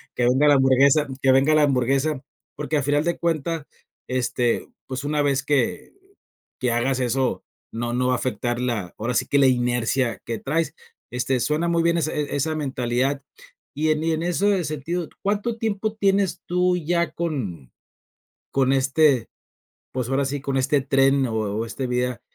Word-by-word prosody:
que 120 - 0
venga 130 +4 +4
la 145 - +7
hamburguesa, 135 +3 +4
que 135 - +4
venga 135 +4 +4
la 155 -1 +5
hamburguesa, 135 +1 +1 0.3
porque 150 +1 -1
a 145 - 0
final 145 +2 +2
de 170 +1 -1
cuentas, 165 -1 -1 0.4
este, 125 -1 0 0.2
pues 130 +1 -4
una 150 +1 0
vez 140 -1 +1
que 140 -5 0 0.7
que 125 -2 0
hagas 125 +3 0
eso, 130 +1 0 0.3
no 120 +1 -3
no 125 +1 +1
va 130 - +2
a - - +3
afectar 120 -1 -2
la 115 -8 -2
ahora 120 +3 -2
sí - - +1
que 140 - +1
la 135 - +6
inercia 120 0 +1
que 115 -1 -3
traes. 155 +2 -1 0.4
Este, 125 +1 0
suena 150 +6 0
muy 170 -1 +2
bien 170 0 +2
e - - +1 0.3
esa 155 +3 0
mentalidad 135 -1 -1 0.5
y 155 +2 0
en 155 0 0
y 165 - +1
en 160 +1 -1
ese 190 +2 +1
sentido, 155 +3 -3 0.2
¿cuánto 210 +3 -1
tiempo 215 -1 -1
tienes 200 -2 +1
tú 180 +1 +2
ya 170 0 0
con 105 - -4 0.8
con 135 0 +3
este 135 -2 +3 0.6
pues 125 -2 -3
ahora 135 +1 +1
sí 140 +1 -3
con 135 -1 -2
este 135 +2 +2
tren 135 0 +3
o 115 - -4
o 110 0 -1
este 130 +3 -4
vida 125 0 -1
135 Hz, 175 wpm, -23 LUFS, 125-155 Hz, 0.8 s, la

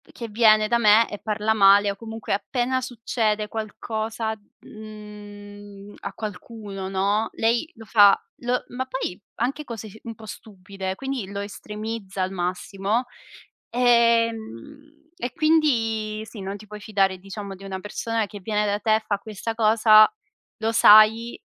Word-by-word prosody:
che 235 - -6
viene 215 -1 +4
da 235 - +2
me 220 0 +5
e 205 - -6
parla 215 +1 -1
male, 200 0 +6
o 200 - -5
comunque, 225 0 -6
appena 245 +5 -1
succede 225 -3 -2
qualcosa, 220 0 -4 0.3
mhmm, 205 -1 -12
a 200 - -6
qualcuno, 205 -2 -7
no, 200 +3 0
lei 235 +8 0
lo 225 - -11
fa 205 -2 +6 0.2
lo 245 +1 -1
ma 260 +1 -4
poi, 260 -8 -4 0.2
anche 270 +6 -2
cose 225 -4 -7
s 215 - -14
un 230 - -6
po' 220 0 -13
stupide, 195 -2 -7
quindi 265 -3 -4
lo 200 0 -4
estremizza 210 -1 -6
al 185 +1 -2
massimo. 195 +5 -2 0.7
Ehm, 235 - 0
e 245 -8 -4
quindi 225 -9 +1
sì, 220 - -10
non 195 +1 -5
ti 210 +1 -14
puoi 210 0 -10
fidare, 195 -3 0
diciamo, 195 +1 -8
di 195 +1 -13
una 190 -1 -5
persona 225 +2 -2
che 205 0 -10
viene 210 +2 -1
da 205 0 -1
te, 220 +1 +2
fa 205 - 0
questa 215 +2 -6
cosa, 215 -1 +6 0.5
lo 225 0 -1
sai, 225 +2 +6
215 Hz, 150 wpm, -24 LUFS, 200-230 Hz, 0.7 s, male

